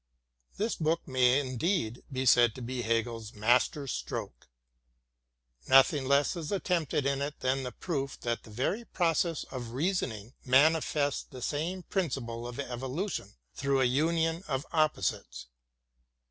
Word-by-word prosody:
This 220 +3 0
book 165 +1 0
may 130 0 +4
indeed 130 - -1
be 130 0 -2
said 120 -3 +5
to 130 - -8
be 125 +1 -3
Hegel's 115 0 -2
mas 120 +4 +4
ter 145 -2 -8
stroke. - - -5 1.2
Nothing 135 +1 +5
less 140 +5 +3
is 165 -3 -5
attempted 170 -7 0
in 140 0 0
it 145 +1 -4
than 130 +1 +1
the 125 -1 -4
proof 140 -5 -4
that 120 -1 -2
the - - -15
very 130 - -1
process 165 -5 0
of 120 -3 -6
reasoning 130 - -2
manifests 145 +1 +3
the 125 -2 -10
same 170 +7 -2
prin 190 -3 -1
ciple 120 -2 -5
of 125 - -8
evolution 130 - -4 0.2
through 140 -1 0
a - - +4
union 165 +6 +1
of 135 0 -2
opposites. 100 - 0
135 Hz, 145 wpm, -30 LUFS, 120-160 Hz, 1.2 s, said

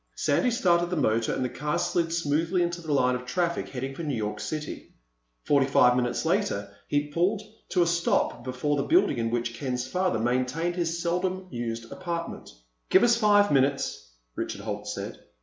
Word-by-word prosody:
Sandy 255 - +2
started 175 -8 +2
the 180 - -1
motor 115 -6 +1
and 130 - -1
the - - -1
car 150 +4 -2
slid 170 -2 0
smoothly 165 +2 +1
into 175 0 -2
the 160 -2 -5
line 125 -3 +3
of 125 0 -3
traffic 170 +6 -1
heading 135 +1 -4
for 150 - -7
New 150 -5 -2
York 105 -2 -3
City. 155 -1 -6 0.5
Forty 140 -2 +3
five 125 -2 +5
minutes 125 +4 0
later 160 - 0
he 145 0 0
pulled 185 +7 +1 0.3
to 180 -2 +3
a - - +1
stop 170 -7 +1
before 130 +4 -1
the - - +1
building 325 - +4
in 115 0 0
which 120 0 -1
Ken's 125 +1 -3
father 180 +1 0
maintained 130 +9 0
his 170 -1 -1
seldom 180 +2 -1
used 115 -1 -4
apartment. 170 -2 -5 0.4
"Give 190 - +6
me 240 - +5
five 210 -4 +4
minutes," 135 - +1 0.2
Richard - - -4
Holt - - -5
said. - - -5
150 Hz, 185 wpm, -27 LUFS, 125-175 Hz, 0.5 s, Give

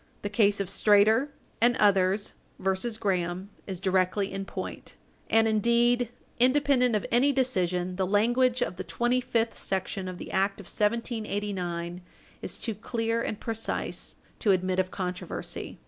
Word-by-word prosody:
The 205 - -2
case 205 -1 +3
of 200 - -1
Strader 210 +6 +4 0.3
and 240 +1 +5
others 195 0 +3 0.2
v. 190 0 +1 0.2
Graham 185 0 -1 0.2
is 190 -3 -5
directly 190 +1 +1
in 195 0 -4
point, - - -7 0.3
and, 225 0 +4
indeed, 235 +2 +3 0.3
independent 255 -2 +4
of 210 - -1
any 255 +4 +4
decision, 185 -9 0
the 190 -1 0
language 240 +5 +3
of 180 - -5
the 185 - -4
25th 240 0 0
section 190 0 -3
of 185 -1 -6
the - - -8
act 195 +1 +1
of 200 - -10
1789 205 -6 -2 0.4
is - - -6
too 225 - -3
clear 230 +2 -2
and 210 - -3
precise 225 -1 -3 0.2
to 215 - +1
admit 185 -1 +2
of 185 0 +1
controversy. 180 -1 -5
205 Hz, 145 wpm, -28 LUFS, 185-235 Hz, 0.4 s, and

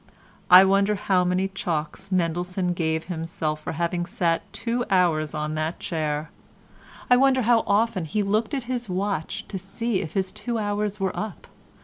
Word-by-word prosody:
I 185 +2 +10
wonder 200 +2 +3
how 190 -2 +2
many 180 +2 +1
chalks 190 0 -4
Mendelssohn 180 +1 0
gave 160 -2 -1
himself 160 -3 -3
for - - -4
having 175 +1 -1
sat 165 -2 -1
two 245 +1 -2
hours 165 -5 +2
on 150 0 -2
that 155 +2 -2
chair. 155 -2 -2 0.8
I - - +9
wonder 260 -1 +4
how 230 0 +4
often 205 -4 +2
he 205 +7 -1
looked 215 +6 0
at 265 - -2
his 240 -2 -4
watch 190 -2 -2
to 195 - -5
see 195 +3 -2
if 160 - -6
his 190 -1 0
two 230 +3 -4
hours 210 -1 -2
were 190 -1 -1
up. 215 -3 -5
185 Hz, 165 wpm, -25 LUFS, 165-210 Hz, 0.8 s, I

